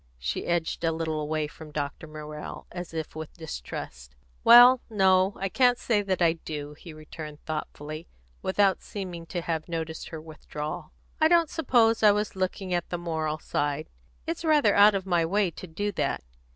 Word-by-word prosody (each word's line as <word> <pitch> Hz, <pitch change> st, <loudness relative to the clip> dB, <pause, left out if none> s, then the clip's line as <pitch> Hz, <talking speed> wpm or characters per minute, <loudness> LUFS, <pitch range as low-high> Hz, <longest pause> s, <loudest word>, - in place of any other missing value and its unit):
She -, -, -3 dB
edged 170 Hz, -1 st, -1 dB
a 165 Hz, -, +2 dB
little 160 Hz, -1 st, -2 dB
away 155 Hz, 0 st, -1 dB
from 155 Hz, +1 st, -11 dB
Dr. 145 Hz, +1 st, -4 dB
Morrell, 150 Hz, 0 st, -8 dB
as 175 Hz, -1 st, -6 dB
if 160 Hz, -2 st, -5 dB
with 160 Hz, +1 st, -8 dB
distrust. 60 Hz, -, -7 dB, 0.3 s
"Well, 245 Hz, +2 st, +9 dB
no; 190 Hz, -2 st, +4 dB
I 195 Hz, -, -1 dB
can't 245 Hz, +4 st, +3 dB
say 220 Hz, -4 st, +1 dB
that 190 Hz, -3 st, 0 dB
I 165 Hz, -1 st, +5 dB
do," 150 Hz, -3 st, -6 dB
he 165 Hz, +3 st, -12 dB
returned 155 Hz, -1 st, -9 dB
thoughtfully, 155 Hz, 0 st, -5 dB, 0.3 s
without 195 Hz, 0 st, +2 dB
seeming 180 Hz, -5 st, -7 dB
to 175 Hz, -, -3 dB
have 165 Hz, -1 st, -3 dB
noticed 160 Hz, -1 st, -4 dB
her 160 Hz, -, -6 dB
withdrawal. 155 Hz, +1 st, -7 dB, 0.3 s
"I 315 Hz, -, +6 dB
don't 335 Hz, -1 st, +4 dB
suppose 235 Hz, -7 st, +3 dB
I 210 Hz, -2 st, +7 dB
was 210 Hz, 0 st, -2 dB
looking 185 Hz, 0 st, -2 dB
at 175 Hz, -1 st, -1 dB
the 175 Hz, -, -2 dB
moral 160 Hz, -3 st, -2 dB
side. 145 Hz, -, -2 dB, 0.3 s
It's 330 Hz, +1 st, -3 dB
rather 295 Hz, -10 st, +4 dB
out 205 Hz, 0 st, +7 dB
of 190 Hz, -1 st, -2 dB
my 175 Hz, -3 st, +2 dB
way 190 Hz, +2 st, +1 dB
to 185 Hz, -, -9 dB
do 205 Hz, +6 st, -2 dB
that. -, -, -1 dB
170 Hz, 180 wpm, -27 LUFS, 155-200 Hz, 0.3 s, Well